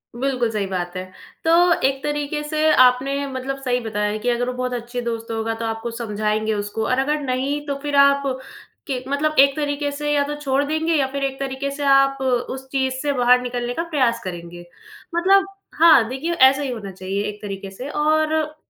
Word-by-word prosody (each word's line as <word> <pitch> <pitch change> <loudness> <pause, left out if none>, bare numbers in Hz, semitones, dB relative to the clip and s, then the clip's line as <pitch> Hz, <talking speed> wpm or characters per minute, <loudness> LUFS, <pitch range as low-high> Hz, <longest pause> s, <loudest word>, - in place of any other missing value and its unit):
बिल्कुल 250 -2 0
सही 210 -2 -1
बात 180 -1 -4
है। 185 - -3 0.4
तो 325 - +3 0.3
एक 270 0 -2
तरीके 295 0 -2
से 310 +1 +1
आपने 265 +3 +3
मतलब 265 0 -4
सही 250 -1 +1
बताया 210 -2 -2
कि 245 +3 -2
अगर 245 0 0
वो - - -3
बहुत 250 0 -2
अच्छे 240 +1 -4
दोस्त 230 -1 -4
होगा, 225 0 -2
तो 230 0 -5
आपको 225 +1 -3
समझाएँगे 215 -1 -1
उसको 205 +1 -3
और 255 - +1
अगर 300 +3 0
नहीं 275 +2 -2
तो 280 - -1
फिर 290 0 -3
आप, 280 0 +5 0.6
कि 260 -3 -3
मतलब 305 +2 0
एक 275 0 +6
तरीके 290 -1 -2
से 295 +1 -3
या 290 -1 +3
तो 295 - -3
छोड़ 275 -1 +1
देंगे 315 +3 0
या 275 -3 +2
फिर 280 0 -3
एक 270 -1 -2
तरीके 275 0 -3
से 285 +1 -5
आप 275 0 +4 0.3
उस 265 0 -6
चीज़ 265 -1 0
से 290 -1 0
बाहर 250 -1 +4
निकलने 245 -1 -3
का 330 - -2
प्रयास 255 -7 +1
करेंगे। 175 -1 -8 0.5
मतलब 385 +3 +4 0.3
हाँ, 315 -9 +7
देखिए, 280 +7 -3
ऐसा 270 -2 +5
ही 280 - -2
होना 210 -5 -6
चाहिए, 190 +2 -3
एक 210 0 -6
तरीके 195 -1 -6
से 250 +8 -7
और 310 +1 +1
265 Hz, 200 wpm, -21 LUFS, 230-285 Hz, 0.6 s, हाँ